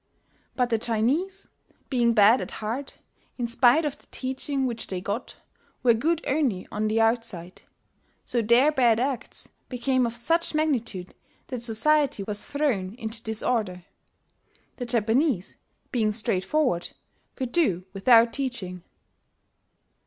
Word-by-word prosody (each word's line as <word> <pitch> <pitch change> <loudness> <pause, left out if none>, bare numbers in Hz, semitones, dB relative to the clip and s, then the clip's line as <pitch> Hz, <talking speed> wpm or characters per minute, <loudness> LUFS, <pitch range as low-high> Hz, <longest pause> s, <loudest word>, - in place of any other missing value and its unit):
But 250 -2 0
the 225 - +2
Chinese, 265 - -1 0.4
being 235 -3 +2
bad 215 +4 +6
at - - -5
heart, 235 +6 -5 0.4
in 245 - -1
spite 245 +6 +4
of 290 - -3
the - - -15
teaching 265 +1 -2
which 235 -2 -3
they 185 - -3
got, 200 +6 -4 0.5
were 240 -2 +6
good 315 +8 0
only 265 -10 0
on 215 +1 -1
the 220 +1 +1
outside; 225 -6 -1 0.6
so 240 - +1
their 240 +7 +5
bad 240 -6 +3
acts 265 0 -3 0.2
became 255 0 +1
of 230 - -5
such 330 +7 +1
magnitude 235 - -1 0.4
that 250 -3 -4
society 245 +1 +2
was 205 +1 -3
thrown 245 -10 -1
into 225 -1 -4
disorder. 220 -4 -1 0.9
The 245 - -5
Japanese, 235 - +1 0.3
being 220 -4 +1
straightforward, 205 - 0 0.4
could 255 -3 -4
do 200 - +1
without 230 +3 +5
teaching." 210 -10 -3
235 Hz, 130 wpm, -26 LUFS, 215-265 Hz, 0.9 s, bad